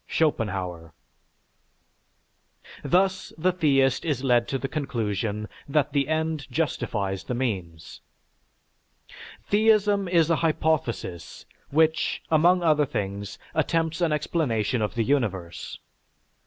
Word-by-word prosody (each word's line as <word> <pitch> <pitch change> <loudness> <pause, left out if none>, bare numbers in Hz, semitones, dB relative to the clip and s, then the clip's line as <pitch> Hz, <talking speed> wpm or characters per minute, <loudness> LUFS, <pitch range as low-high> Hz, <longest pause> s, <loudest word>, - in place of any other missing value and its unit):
(Schopenhauer.) 95 - -1 1.9
Thus 190 +1 +1
the 180 +3 +2
theist 135 -7 +2
is 145 -5 -1
led 120 -3 +3
to 135 - -1
the 135 - -3
conclusion 110 - -2 0.2
that 145 0 +1
the 140 -2 +1
end 160 -1 -1
justifies 105 - -2
the 125 - -3
means. 95 -10 -4 1.4
Theism 205 -2 +3
is 170 -2 +3
a 165 - +3
hypothesis 155 - -1 0.2
which, 160 +2 +1
among 175 +3 +4
other 150 -3 +3
things, 100 -2 -4 0.2
attempts 165 +1 0
an 170 -2 +2
explanation 135 -7 0
of 105 +2 -2
the 115 - +1
universe. 100 - -2
140 Hz, 105 wpm, -25 LUFS, 105-160 Hz, 1.9 s, among